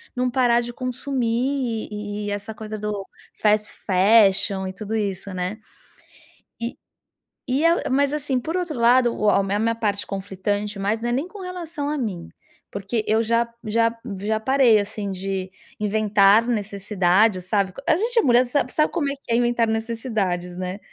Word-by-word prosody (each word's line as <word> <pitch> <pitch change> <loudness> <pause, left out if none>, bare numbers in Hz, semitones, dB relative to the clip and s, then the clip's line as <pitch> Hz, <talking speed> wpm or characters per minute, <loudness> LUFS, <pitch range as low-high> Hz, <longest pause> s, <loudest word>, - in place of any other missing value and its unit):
não 250 0 0
parar 240 -2 +3
de 240 0 -5
consumir, 250 -1 -2
e 210 0 -5
e - - -2
essa 205 +2 -4
coisa 215 0 -6
do 205 -2 -3 0.3
fast 210 0 +2 0.2
fashion 195 0 +4
e 190 - -5
tudo 215 +2 -5
isso, 200 -2 -3
né. 185 +4 -3 1.0
E 235 +1 -4 0.7
e 270 +4 0
a 335 +1 +2
mas, 280 +2 +2
assim, 275 -3 -1
por 320 +7 -4
outro 345 -8 -2
lado 240 0 +4
o 210 - +1
a 200 - +3
minha 195 +1 -1
minha 230 +1 +1
parte 205 -3 -1
conflitante, 200 +1 -3
mas 210 +3 -1
não 240 - -1
é - - 0
nem 270 +7 -1
com 395 +2 -11
relação 340 -5 -5
a 300 - -1
mim, 195 -10 -4 0.4
porque 200 +3 -2
eu 220 +1 +2
já 230 +1 +2 0.2
já 230 +1 +2 0.3
já 215 +2 0
parei, 250 -2 +4
assim, 205 0 -4
de 190 0 -4 0.3
inventar 210 +1 +4
necessidades, 200 -2 +1
sabe, 195 -1 0
co 275 - -9
a 335 - +4
gente 465 +7 -1
é - - +5
mulher, 245 - +4
sabe 270 +4 -1
sabe 305 - +2
como 290 -5 0
é - - -2
que 235 - -3
é - - +4
inventar 240 -1 +2
necessidades, 220 -6 -2
né. 185 +2 -4
220 Hz, 180 wpm, -23 LUFS, 200-250 Hz, 1.0 s, é